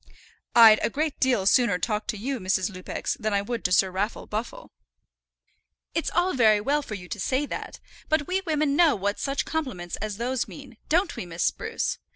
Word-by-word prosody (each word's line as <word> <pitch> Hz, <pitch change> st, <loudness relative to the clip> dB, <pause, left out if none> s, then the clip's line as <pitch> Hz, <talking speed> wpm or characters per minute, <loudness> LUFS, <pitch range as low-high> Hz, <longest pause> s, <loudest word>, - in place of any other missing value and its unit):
"I'd 225 Hz, -2 st, +9 dB
a -, -, +1 dB
great 300 Hz, +3 st, -2 dB
deal 245 Hz, -7 st, +2 dB
sooner 205 Hz, -2 st, +4 dB
talk 210 Hz, +4 st, -2 dB
to 215 Hz, -, -2 dB
you, 260 Hz, +5 st, -3 dB
Mrs. 185 Hz, 0 st, 0 dB
Lupex, 185 Hz, -1 st, -4 dB
than 215 Hz, -2 st, -1 dB
I 200 Hz, -, +1 dB
would 235 Hz, +2 st, -4 dB
to 180 Hz, -, +2 dB
Sir 185 Hz, +1 st, +4 dB
Raffle 200 Hz, +4 st, -3 dB
Buffle." 240 Hz, -, -5 dB, 1.2 s
"It's 330 Hz, -, -1 dB
all 355 Hz, +2 st, +1 dB
very 220 Hz, -5 st, +4 dB
well 285 Hz, +8 st, +1 dB
for 220 Hz, -7 st, -6 dB
you 180 Hz, -3 st, -9 dB
to 210 Hz, -, -6 dB
say 260 Hz, +8 st, 0 dB
that. -, -, -6 dB, 0.3 s
But 310 Hz, -1 st, +2 dB
we 375 Hz, +4 st, -1 dB
women 305 Hz, -5 st, 0 dB
know 330 Hz, -1 st, +5 dB
what 200 Hz, 0 st, -2 dB
such 275 Hz, 0 st, -1 dB
compliments 235 Hz, -, -4 dB
as 210 Hz, -1 st, -4 dB
those 245 Hz, +2 st, -1 dB
mean; 270 Hz, -5 st, -12 dB
don't 345 Hz, +3 st, +2 dB
we, 180 Hz, -, -6 dB
Miss 170 Hz, 0 st, -3 dB
Spruce? -, -, -1 dB
235 Hz, 200 wpm, -26 LUFS, 200-290 Hz, 1.2 s, I'd